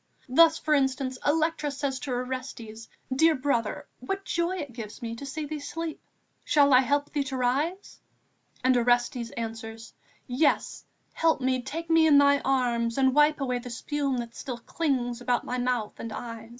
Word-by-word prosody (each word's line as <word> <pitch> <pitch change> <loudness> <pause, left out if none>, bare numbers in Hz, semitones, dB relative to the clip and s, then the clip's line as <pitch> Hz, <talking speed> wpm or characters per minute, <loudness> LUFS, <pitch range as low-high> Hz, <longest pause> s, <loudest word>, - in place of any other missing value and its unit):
Thus, 320 +5 +5
for 305 - 0
instance, 265 -2 0
Electra 315 0 +1
says 280 -1 -3
to 260 - -5
Orestes: 245 -3 -5 0.3
'Dear 320 +3 +5
brother, 255 -5 -1
what 390 +10 -4
joy 345 +2 -1
it 285 -7 -6
gave 220 -3 -8
me 230 0 -3
to 280 - -7
see 300 +3 -4
thee 305 +1 -5
sleep! 320 +2 -5 0.4
Shall 285 -2 +4
I 255 - +8
help 285 +2 0
thee 290 -2 0
to 265 -1 -4
rise?' 285 +10 -1 0.6
And 255 0 +4
Orestes 240 0 +1
answers: 225 0 -6 0.3
'Yes, 270 +5 0 0.3
help 325 -3 +2
me, 255 -1 0
take 320 +6 -6
me 325 -1 +5
in 295 -2 +6
thy 285 0 +5
arms, 240 -3 0
and 265 -1 +3
wipe 295 +1 +4
away 250 -2 -1
the 245 +1 -8
spume 275 +2 -2
that 235 -1 -5
still 250 -1 -6
clings 245 -2 -2
about 245 0 0
my 250 - -3
mouth 245 -3 -1
and 230 - -6
eyes. 230 0 -7
260 Hz, 175 wpm, -27 LUFS, 245-295 Hz, 0.6 s, I